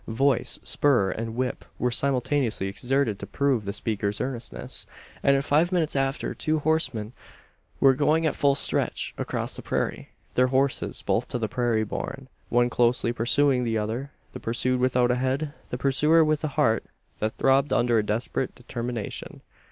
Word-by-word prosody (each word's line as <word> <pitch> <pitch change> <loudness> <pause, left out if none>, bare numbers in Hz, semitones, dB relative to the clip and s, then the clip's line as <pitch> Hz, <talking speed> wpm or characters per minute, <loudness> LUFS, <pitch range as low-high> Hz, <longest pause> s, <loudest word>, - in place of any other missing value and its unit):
Voice, 130 +3 +1
spur, 120 -10 +2
and 115 +3 -4
whip 130 +1 -2
were 125 - 0
simultaneously 130 -4 0
exerted 115 +2 0
to - - -7
prove 135 -7 0
the 100 - -2
speaker's 105 -1 -2
earnestness; 120 - -5 0.3
and 140 - +4
in 135 - +1
five 155 +5 +2
minutes 165 -5 +1
after, 135 0 0
two 155 0 0
horsemen 130 -8 -1 0.7
were 135 -1 +6
going 150 +4 +2
at 155 - +1
full 140 -1 +3
stretch - - 0
across - - -3
the - - -6
prairie - - -2 0.2
their 125 0 +4
horses 135 +1 0
both - - 0
to - - -2
the 115 -2 -1
prairie 120 -1 0
born 135 +5 -5 0.2
one 120 0 +3
closely 120 -1 +1
pursuing 125 +3 +2
the 115 -2 0
other 115 +6 -3 0.2
the - - -6
pursued 125 +2 0
without 125 -1 +3
a - - +2
head; 135 +4 -1 0.2
the 125 - -3
pursuer 150 +5 +4
with 155 0 0
a - - +1
heart 110 0 +3 0.4
that 110 +1 -1
throbbed 135 +2 +3
under 120 -1 +3
a - - +1
desperate 115 +4 -2
determination. 120 -3 -5
125 Hz, 165 wpm, -26 LUFS, 115-140 Hz, 0.7 s, were